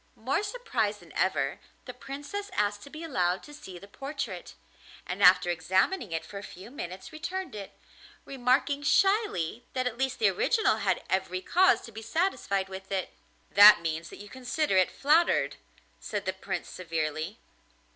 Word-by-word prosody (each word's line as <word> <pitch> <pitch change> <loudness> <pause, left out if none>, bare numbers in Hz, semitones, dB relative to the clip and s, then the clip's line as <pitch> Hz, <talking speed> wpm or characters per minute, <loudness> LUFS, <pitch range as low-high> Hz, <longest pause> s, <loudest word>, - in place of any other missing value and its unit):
More 265 - -1
surprised 405 - -2
than 170 -3 -16
ever, 140 -7 0 0.3
the 250 - -7
Princess 290 +11 -6
asked 205 0 0
to 280 - -11
be 310 +3 -8
allowed 185 - 0
to 295 - -12
see 190 -11 -10
the 200 - -12
portrait, 275 +7 -6 0.5
and 185 +3 -5
after 180 -1 +6
examining 190 - 0
it 165 0 -3
for 200 - -8
a - - -10
few 195 +4 -11
minutes 190 - -7
returned 345 -1 -4
it, 200 -2 -8 0.5
remarking 270 +2 +1
shyly 290 - +2
that 255 -1 -1
at 245 -1 -3
least 265 -1 0
the 445 - +4
original 455 -3 +2
had - - 0
every 185 -1 -1
cause 375 - +4
to 230 - -11
be 220 +1 -8
satisfied 230 - 0
with 190 0 -9
it. 190 -2 -2 0.4
'That 205 -2 +9
means 165 0 -3
that - - -11
you 205 - -10
consider 260 +2 -1
it 185 -1 +4
flattered,' 315 +5 +2 0.4
said - - -4
the - - -1
Prince - - -5
severely. 160 +2 -3
215 Hz, 165 wpm, -28 LUFS, 185-290 Hz, 0.5 s, That